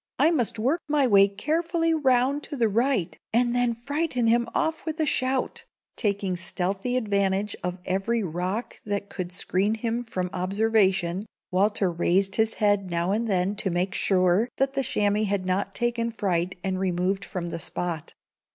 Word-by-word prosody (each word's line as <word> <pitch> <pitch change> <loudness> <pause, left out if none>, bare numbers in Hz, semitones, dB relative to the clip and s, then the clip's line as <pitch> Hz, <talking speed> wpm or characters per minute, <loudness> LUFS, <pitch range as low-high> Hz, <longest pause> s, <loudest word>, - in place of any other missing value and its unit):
"I 320 - +4
must 245 -8 +1
work 270 +10 +1
my 290 -2 +3
way 200 -4 +6
carefully 330 - 0
round 270 -1 +2
to - - -6
the 235 -4 +2
right, 230 -3 0 0.2
and 240 +1 +2
then 245 -1 +1
frighten 275 +1 -1
him 235 +1 +3
off 320 0 0
with 320 0 -4
a 315 - +2
shout." 265 -3 0 0.3
Taking 200 -3 -1
stealthy 195 +7 -1
advantage 200 -2 0
of 180 0 -2
every 200 +5 0
rock 185 +6 -3
that 200 -1 -3
could 180 -2 -4
screen 195 +3 0
him 230 +1 -2
from 185 -6 -4
observation, 195 -1 +1 0.2
Walter 195 0 +2
raised 190 +3 +1
his 220 0 +2
head 205 -3 +2
now 170 +2 0
and 225 +3 0
then 190 0 +1
to 195 - 0
make 180 +2 -1
sure 185 +5 +2
that 270 0 +1
the 275 - 0
chamois 210 -2 +1
had 200 -2 -1
not 185 +1 -1
taken 240 -1 0
fright 185 -5 -1
and 190 -1 -1
removed 190 +1 0
from 180 -3 -5
the 170 -1 -4
spot. 165 -2 -4
205 Hz, 170 wpm, -26 LUFS, 185-245 Hz, 0.3 s, way